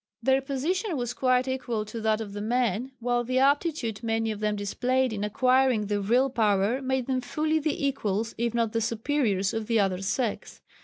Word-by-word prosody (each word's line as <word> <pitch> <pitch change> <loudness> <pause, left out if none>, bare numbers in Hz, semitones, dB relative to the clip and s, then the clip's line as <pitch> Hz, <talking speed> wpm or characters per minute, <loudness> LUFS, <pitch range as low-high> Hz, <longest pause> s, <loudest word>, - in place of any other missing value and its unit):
Their 265 +2 +3
position 310 - -2
was 240 -1 -2
quite 255 0 +2
equal 245 -4 -2
to 220 +2 -6
that 220 0 +1
of 205 -2 -6
the 205 - -5
men, 240 +1 0
while 245 0 0
the 255 +2 -1
aptitude 275 - +1
many 225 -1 0
of 210 - -5
them 210 0 0
displayed 250 +5 0
in 205 -1 -3
acquiring 255 +1 +2
the 205 0 -1
vril 245 +6 +2
power 215 +1 +1
made 265 -1 -1
them 255 0 -1
fully 310 +5 0
the 295 -2 -1
equals 225 -5 -1
if 235 0 -1
not 230 -2 +1
the 230 - -1
superiors 225 -4 0
of 225 -1 -3
the 230 -2 +2
other 190 -2 +1
sex. 210 +3 -2
235 Hz, 195 wpm, -27 LUFS, 215-265 Hz, -, Their